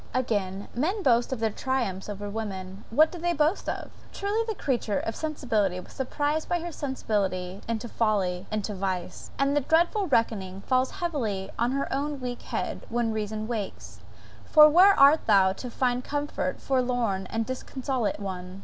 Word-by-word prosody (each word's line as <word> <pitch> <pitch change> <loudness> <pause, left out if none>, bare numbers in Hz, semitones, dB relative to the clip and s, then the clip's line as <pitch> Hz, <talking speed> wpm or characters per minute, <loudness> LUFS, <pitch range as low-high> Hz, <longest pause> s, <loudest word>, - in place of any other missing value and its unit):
Again; 205 -6 -1
men 370 - -1
boast 240 -1 +3
of 260 - -2
their 225 -1 +1
triumphs 210 -6 -2
over 205 0 -5
women, 195 -2 -5
what 310 +7 +5
do 350 - -7
they 345 +1 +1
boast 315 +4 +1
of? - - -4 0.2
Truly 410 +3 -1
the 440 - -2
creature 240 - -1
of 225 - -3
sensibility 225 - 0
was - - -12
surprised 290 +4 -1
by 350 - +1
her 345 +1 -5
sensibility 200 - -2
into 230 0 -2
folly 195 -5 0
into 215 0 -2
vice;* 185 -2 -4
and 275 +1 +2
the 290 - +3
dreadful 345 - +2
reckoning 195 -7 0
falls 255 +3 +2
heavily 240 - -3
on 240 +2 +2
her 275 0 -1
own 285 +1 -2
weak 245 -1 -5
head, - - -4
when 230 -1 0
reason 215 0 -3
wakes. 220 -5 -5 0.4
For 305 -1 +8
where 370 +6 +6
art 280 +3 +6
thou 195 -3 +5
to 250 +5 -7
find 250 +1 0
comfort, 290 -1 -2
forlorn 245 -7 0
and 225 +3 -2
disconsolate 255 -4 -2
one? 185 -1 -6
240 Hz, 165 wpm, -27 LUFS, 200-285 Hz, 0.4 s, For